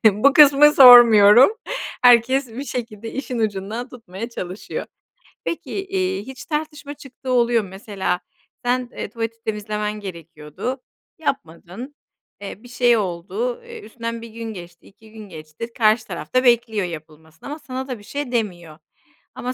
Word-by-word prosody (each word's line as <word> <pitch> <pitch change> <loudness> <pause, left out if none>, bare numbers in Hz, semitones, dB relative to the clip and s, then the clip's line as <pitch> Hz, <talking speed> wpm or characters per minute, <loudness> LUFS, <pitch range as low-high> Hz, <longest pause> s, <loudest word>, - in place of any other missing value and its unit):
bu 270 +7 +4
kısmı 295 0 +7
sormuyorum. 240 - +9 0.5
Herkes 250 +2 +5
bir 235 +4 -7
şekilde 225 -4 -6
işin 255 -3 -4
ucundan 215 +3 -3
tutmaya 230 -2 -8
çalışıyor. 185 -4 -6 0.6
Peki, 335 - -5
eee, 380 - -2
hiç 265 -1 -9
tartışma 300 -2 -4
çıktığı 270 -2 -9
oluyor 240 -2 +2
mu? 195 - -10
Mesela 190 -2 -3 0.5
sen, 250 0 0
eee, - - -6
tuvaleti 230 0 -5
temizlemen 210 -1 -3
gerekiyordu, 170 - -7 0.4
yapmadın, 245 - -5 0.5
eee, 205 +2 -8
bir - - -13
şey 245 -1 +2
oldu, 220 - -3
eee, 470 -1 -10
üstünden 230 - -6
1 230 - -10
gün 225 0 -7
geçti, 175 -2 -12
2 215 +2 -20
gün 215 -2 -11
geçti, 155 +9 -9
karşı 220 0 +3
taraf - - -8
da 255 0 +3
bekliyor 235 -5 +2
yapılmasını 160 - -10
ama 300 +2 -6
sana 260 -2 -6
da 250 -4 -5
bir - - -16
şey 285 +3 -5
demiyor 175 -9 -3 0.6
ama 250 +1 -4
230 Hz, 145 wpm, -21 LUFS, 200-255 Hz, 0.6 s, sormuyorum